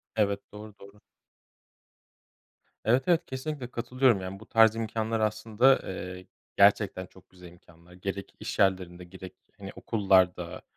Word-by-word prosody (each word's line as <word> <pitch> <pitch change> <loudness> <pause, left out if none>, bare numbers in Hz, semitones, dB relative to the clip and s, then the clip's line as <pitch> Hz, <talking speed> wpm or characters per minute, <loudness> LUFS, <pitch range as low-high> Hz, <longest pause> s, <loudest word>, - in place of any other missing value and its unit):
Evet, 100 -2 +1
doğru, 105 0 -11
doğru. 100 +1 -15 1.9
Evet, 125 +4 +3
evet, 170 -1 +2
kesinlikle 130 -1 -5
katılıyorum. 125 -2 +1
Yani 95 +1 -7
bu 110 - -13
tarz 110 -1 +4
imkânlar 115 0 -2
aslında, 110 +4 +2
eee, 90 -1 -7 0.3
gerçekten 100 -2 +3
çok 95 0 -21
güzel 90 -1 -15
imkânlar. 85 0 -19
Gerek 95 +1 -6
iş - - -6
yerlerinde 90 -2 +1
gerek, 95 +1 -11 0.2
hani, 100 -1 -9
okullarda, 95 -5 +1
100 Hz, 130 wpm, -28 LUFS, 95-115 Hz, 1.9 s, tarz